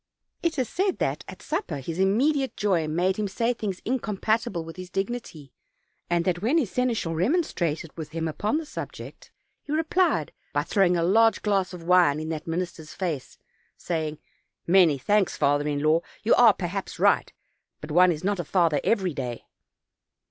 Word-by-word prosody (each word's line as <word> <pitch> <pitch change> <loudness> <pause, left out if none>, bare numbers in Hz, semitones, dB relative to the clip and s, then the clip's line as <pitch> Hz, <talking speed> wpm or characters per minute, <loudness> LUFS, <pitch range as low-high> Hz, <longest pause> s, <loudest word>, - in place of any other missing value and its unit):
It 335 -2 -1
is 255 -3 0
said 380 - 0
that - - -1
at - - -10
supper 315 - -3
his 160 +6 -5
immediate 260 +7 +2
joy 180 -6 +1
made 180 +5 0
him 210 -1 -1
say 230 +5 0
things 205 -6 -5
incompatible 220 -5 -1
with 165 - -9
his 185 0 -8
dignity, 195 - -5 0.6
and 170 -1 +1
that 175 -2 0
when 250 +10 +2
his 255 - 0
seneschal 235 -9 0
remonstrated 170 - -1
with 160 -3 -6
him 165 0 -3
upon 205 - -1
the 320 - -4
subject - - -8 0.3
he 290 - -9
replied 325 +4 +1 0.2
by - - +1
throwing 185 -4 +2
a 170 - +1
large 220 +4 +3
glass 195 -3 +1
of 180 -2 -9
wine 175 -4 +4
in 155 0 -5
that 160 -1 -4
minis 175 +2 -2
ter's 155 -2 -11
face, 165 -8 -4 0.4
saying: 155 -3 -3 0.5
"Many 170 -5 +5
thanks, 205 +7 +1
father 145 0 +2
in 145 -1 -1
law. 155 +2 +3 0.2
You 220 - +4
are, 235 -4 +6
perhaps, 190 +2 -4
right; - - +3 0.5
but 150 - -8
one 180 +3 +6
is 155 0 -4
not 200 0 0
a - - -1
father 165 -3 +2
every 190 -7 +1
day. 125 -4 -5
185 Hz, 175 wpm, -26 LUFS, 165-225 Hz, 0.6 s, are